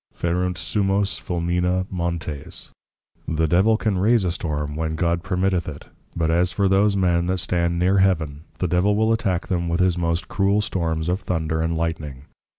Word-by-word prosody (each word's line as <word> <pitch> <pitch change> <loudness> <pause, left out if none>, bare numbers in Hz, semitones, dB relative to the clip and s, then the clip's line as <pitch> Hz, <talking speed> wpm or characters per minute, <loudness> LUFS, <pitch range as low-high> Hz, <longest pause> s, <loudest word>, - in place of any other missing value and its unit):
Ferunt 90 +1 -1
Summos 100 +2 0
Fulmina 90 +1 0
Montes. 85 -5 -4 0.6
The 80 0 +1
Devil 95 +7 +3
can 105 -4 0
raise 110 +2 +3
a 90 - 0
Storm, 75 -4 -3
when 80 0 -2
God 85 +1 0
permitteth 90 -1 0
it, 75 -1 -10 0.3
but 80 -1 +1
as 90 +2 +2
for 100 -2 +1
those 100 +1 +3
Men 85 -2 +2
that 95 +1 0
stand 85 -1 0
near 95 +3 +3
Heaven, 80 -7 +1 0.2
the 90 - -1
Devil 90 +4 +2
will 110 +1 +3
attack 95 -6 -1
them 85 -2 -1
with 85 +1 0
his 90 -1 +2
most 85 0 -1
cruel 100 +1 +1
storms 85 -5 -2
of 90 +2 0
Thunder 80 -4 -2
and 80 0 -1
Lightening. 75 -5 -4
90 Hz, 175 wpm, -23 LUFS, 80-95 Hz, 0.6 s, Devil